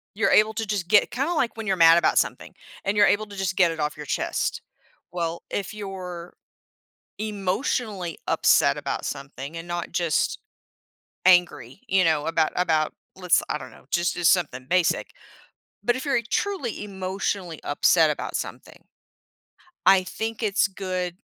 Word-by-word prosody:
you're 210 Hz, -, +2 dB
able 215 Hz, +1 st, +5 dB
to 225 Hz, 0 st, -3 dB
just 200 Hz, -4 st, -2 dB
get 205 Hz, +4 st, +4 dB
kinda 275 Hz, +8 st, -1 dB
like 250 Hz, -8 st, 0 dB
when 220 Hz, -2 st, -5 dB
you're 190 Hz, -, +2 dB
mad 165 Hz, -1 st, +7 dB
about -, -, +2 dB
something, -, -, -1 dB, 0.3 s
and 195 Hz, +1 st, 0 dB
you're 205 Hz, -, +7 dB
able 215 Hz, +1 st, +2 dB
to 200 Hz, -, -11 dB
just 190 Hz, -1 st, -2 dB
get 175 Hz, -3 st, +5 dB
it 160 Hz, -, -7 dB
off 150 Hz, 0 st, -2 dB
your 150 Hz, -, -7 dB
chest. -, -, -2 dB, 0.5 s
Well, 170 Hz, -1 st, -3 dB
if 200 Hz, +1 st, -3 dB
you're 185 Hz, -4 st, -7 dB, 0.9 s
emotionally 200 Hz, -, -2 dB
upset -, -, +3 dB
about -, -, -4 dB
something 140 Hz, +2 st, -6 dB
and 165 Hz, +1 st, -8 dB
not 175 Hz, -1 st, -4 dB
just 170 Hz, -3 st, 0 dB, 0.9 s
angry, 175 Hz, -6 st, +3 dB
you 190 Hz, -1 st, +3 dB
know, 155 Hz, -2 st, +1 dB
about 165 Hz, -1 st, +1 dB
about 160 Hz, -4 st, +1 dB, 0.2 s
let's, 180 Hz, -2 st, +2 dB
I -, -, -1 dB
don't -, -, -10 dB
know, -, -, -18 dB
just 175 Hz, 0 st, +1 dB
just 175 Hz, -1 st, +4 dB
something 135 Hz, -8 st, -1 dB
basic. 180 Hz, -2 st, +1 dB, 0.7 s
But 240 Hz, +1 st, +2 dB
if 260 Hz, -, -5 dB
you're 275 Hz, -4 st, +2 dB
truly 370 Hz, -, -2 dB
emotionally 190 Hz, -3 st, -4 dB
upset 155 Hz, +2 st, +4 dB
about 150 Hz, -, -4 dB
something -, -, -8 dB, 1.0 s
I 190 Hz, -1 st, +7 dB
think 225 Hz, +4 st, -5 dB
it's 200 Hz, -1 st, +2 dB
good 185 Hz, -2 st, -4 dB
185 Hz, 160 wpm, -24 LUFS, 170-205 Hz, 1.0 s, mad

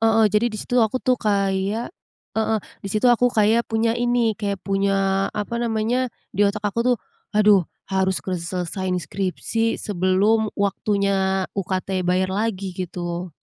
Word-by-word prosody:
heeh, 225 Hz, 0 st, +4 dB
jadi 215 Hz, +3 st, +3 dB
di 215 Hz, -, -6 dB
situ 245 Hz, +3 st, 0 dB
aku 220 Hz, +3 st, +2 dB
tuh 255 Hz, -1 st, +3 dB
kayak 200 Hz, -, 0 dB, 0.4 s
heeh, 220 Hz, 0 st, +1 dB, 0.2 s
di 200 Hz, -, -6 dB
situ 215 Hz, +4 st, -1 dB
aku 245 Hz, +1 st, +3 dB
kayak 225 Hz, 0 st, +2 dB
punya 225 Hz, 0 st, +1 dB
ini, 240 Hz, -1 st, +1 dB
kayak 200 Hz, -1 st, -3 dB
punya, 195 Hz, 0 st, +1 dB
apa 235 Hz, +3 st, -2 dB
namanya, 235 Hz, +2 st, 0 dB, 0.2 s
di 200 Hz, -, -3 dB
otak 210 Hz, +1 st, -4 dB
aku 205 Hz, +3 st, 0 dB
tuh, 245 Hz, 0 st, +3 dB, 0.4 s
"Aduh, 205 Hz, -4 st, +5 dB, 0.3 s
harus 190 Hz, -1 st, +1 dB
kuselesaiin 180 Hz, +1 st, -2 dB
skripsi 200 Hz, +5 st, -1 dB
sebelum 205 Hz, +3 st, +2 dB
waktunya 195 Hz, -1 st, +1 dB
UKT 190 Hz, -1 st, -2 dB
bayar 185 Hz, +1 st, +1 dB
lagi," 195 Hz, -3 st, -2 dB
gitu. 175 Hz, 0 st, -4 dB
200 Hz, 145 wpm, -22 LUFS, 190-225 Hz, 0.4 s, Aduh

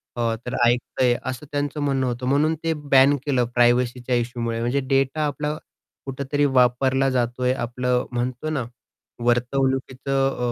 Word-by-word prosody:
अ, 115 Hz, -2 st, 0 dB
तर 125 Hz, -, -4 dB
ऐकतंय 120 Hz, +1 st, +1 dB, 0.2 s
असं 130 Hz, +3 st, -8 dB
त्यांचं 145 Hz, 0 st, -2 dB
म्हणणं 135 Hz, -2 st, 0 dB
होतं. 120 Hz, +1 st, -3 dB
म्हणून 150 Hz, +4 st, +2 dB
ते 165 Hz, 0 st, +1 dB
बॅन 140 Hz, -1 st, +4 dB
केलं, 130 Hz, -4 st, +1 dB
प्रायव्हसीच्या 120 Hz, +1 st, +2 dB
इश्यूमुळे. 115 Hz, -1 st, -2 dB
म्हणजे 120 Hz, +4 st, 0 dB
डेटा 135 Hz, +3 st, +1 dB
आपलं, 150 Hz, +1 st, -3 dB, 0.5 s
कुठेतरी 140 Hz, +2 st, -1 dB
वापरला 130 Hz, 0 st, +3 dB
जातोय. 125 Hz, 0 st, 0 dB
आपलं 125 Hz, 0 st, -1 dB
म्हणतो 125 Hz, +4 st, -3 dB
ना, 140 Hz, -6 st, -2 dB, 0.6 s
वर्तवणुकीचं 130 Hz, +1 st, 0 dB
130 Hz, 130 wpm, -23 LUFS, 120-140 Hz, 0.6 s, बॅन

